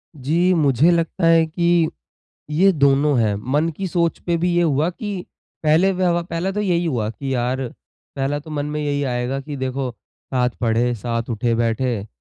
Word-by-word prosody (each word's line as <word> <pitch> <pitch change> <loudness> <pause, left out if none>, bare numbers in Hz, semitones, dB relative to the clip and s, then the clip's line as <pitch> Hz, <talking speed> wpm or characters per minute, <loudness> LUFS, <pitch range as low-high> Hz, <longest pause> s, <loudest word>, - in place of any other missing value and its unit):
जी, 165 +7 +1
मुझे 150 0 +4
लगता 170 +1 0
है 165 -1 +5
कि, 170 0 +2 0.6
ये 185 +6 +4
दोनों 140 -2 +3
हैं। 105 -2 +2 0.2
मन 150 +3 +2
की 195 - -3
सोच 170 -1 0
पे 170 -1 +2
भी 180 - +2
ये 175 - +3
हुआ 150 0 +2
कि 200 -2 -6 0.4
पहले 160 +5 +4
व्यव 180 -2 +1
पहले 170 +4 -1
तो 210 - -2
यही 175 -4 +1
हुआ 120 -9 -1
कि 135 +3 -4
यार 125 +2 -1 0.6
पहला 140 +2 -1
तो 155 +2 -11
मन 145 -1 -2
में 150 +1 -3
यही 145 -1 -1
आएगा 125 +1 -2
कि 145 +1 -7
देखो 130 0 -2 0.4
साथ 125 -1 +2
पढ़े, 120 +1 +1
साथ 115 +1 -3
उठे 115 +1 0
बैठे, 115 -1 -1
145 Hz, 180 wpm, -21 LUFS, 125-170 Hz, 0.6 s, है